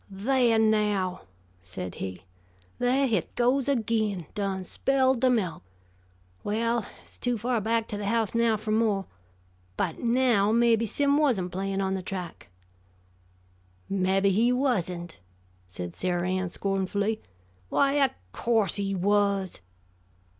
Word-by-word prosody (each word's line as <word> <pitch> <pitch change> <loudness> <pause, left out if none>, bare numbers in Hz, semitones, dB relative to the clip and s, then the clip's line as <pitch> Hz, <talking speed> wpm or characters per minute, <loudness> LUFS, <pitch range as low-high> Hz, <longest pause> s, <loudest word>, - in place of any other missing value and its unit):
"Thah, 235 +3 +2
now," 210 -4 +1 0.4
said 90 0 -6
he. 95 -1 -5 0.6
"Thah 255 +3 +2
hit 220 -9 -1
goes 255 +3 +2
agin. 220 - 0
Done 195 -3 -2
spilled 260 +4 +1
the 260 - +4
melk. 190 -10 0 0.8
Well, 230 +3 0
hit's - - -16
too 245 -1 0
far 235 +1 0
back 225 +1 0
to 205 - -4
the 205 - -3
house 225 -1 +1
now 230 -1 +2
fer 215 +1 -4
mo'. 215 -3 +1 0.7
But, - - -1
now, 235 -4 +3
mabbe 230 0 +3
Sim 285 +6 +2
wasn't 220 -12 +1
playin' 195 +1 -2
on 190 0 0
the 190 - -2
track." 180 - -6 1.4
"Mabbe 195 +1 +2
he 225 +6 +3
wasn't!" 180 - -1 0.5
said 90 -1 -6
Sarah 180 -1 -1
Ann 185 0 -1
scornfully. 200 +3 -1 0.5
"Why, 280 0 +3
o' 270 - +4 0.2
course 220 - +1
he 195 -1 -1
was." 200 - +1
210 Hz, 130 wpm, -27 LUFS, 190-235 Hz, 1.4 s, the